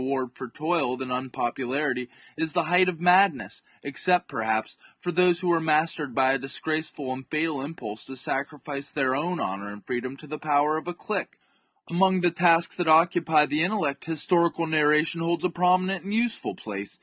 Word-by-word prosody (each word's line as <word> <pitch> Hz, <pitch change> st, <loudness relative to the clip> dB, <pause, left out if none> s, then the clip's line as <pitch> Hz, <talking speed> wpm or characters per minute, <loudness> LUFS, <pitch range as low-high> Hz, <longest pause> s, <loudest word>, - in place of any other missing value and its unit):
ward 130 Hz, -1 st, -2 dB
for 130 Hz, -2 st, -8 dB
toil 150 Hz, -3 st, -1 dB
than 130 Hz, -1 st, -5 dB
unpopularity, 125 Hz, +1 st, -2 dB, 0.3 s
is 160 Hz, -2 st, -2 dB
the -, -, +2 dB
height 180 Hz, +2 st, +4 dB
of 170 Hz, -3 st, -5 dB
mad 180 Hz, 0 st, +5 dB
ness, 105 Hz, -5 st, -9 dB, 0.2 s
except, 180 Hz, +6 st, +2 dB
perhaps, 110 Hz, -4 st, -2 dB, 0.2 s
for 175 Hz, -, -4 dB
those 175 Hz, 0 st, +3 dB
who 180 Hz, -1 st, +1 dB
are 170 Hz, -, +3 dB
mastered 155 Hz, -3 st, 0 dB
by 130 Hz, 0 st, +3 dB
a -, -, +2 dB
disgraceful 145 Hz, 0 st, -3 dB
and 130 Hz, 0 st, -9 dB
fatal 155 Hz, -2 st, -1 dB
impulse 125 Hz, -8 st, -7 dB
to 135 Hz, -, -8 dB
sacrifice 140 Hz, +2 st, -4 dB
their 130 Hz, -3 st, 0 dB
own 175 Hz, +5 st, -1 dB
honour 100 Hz, +2 st, -3 dB
and 105 Hz, 0 st, -11 dB
freedom 130 Hz, +2 st, -4 dB
to 155 Hz, -, -13 dB
the 155 Hz, +1 st, -6 dB
power 150 Hz, 0 st, +2 dB
of 160 Hz, -, -7 dB
a 175 Hz, -, -3 dB
clique. 215 Hz, +4 st, -4 dB, 0.6 s
CHAP. -, -, -13 dB
Among 190 Hz, 0 st, +3 dB
the 175 Hz, -1 st, +3 dB
tasks 170 Hz, -1 st, +3 dB
that 175 Hz, -2 st, -1 dB
occupy 160 Hz, -1 st, +4 dB
the 150 Hz, +1 st, 0 dB
intellect, 175 Hz, -7 st, -1 dB
historical 170 Hz, +1 st, +1 dB
narration 155 Hz, +1 st, +2 dB
holds 170 Hz, +2 st, -1 dB
a -, -, +2 dB
prominent 180 Hz, +2 st, +1 dB
and 200 Hz, +2 st, -5 dB
useful 235 Hz, 0 st, 0 dB
place. 100 Hz, -2 st, -7 dB
155 Hz, 185 wpm, -25 LUFS, 130-175 Hz, 0.6 s, mad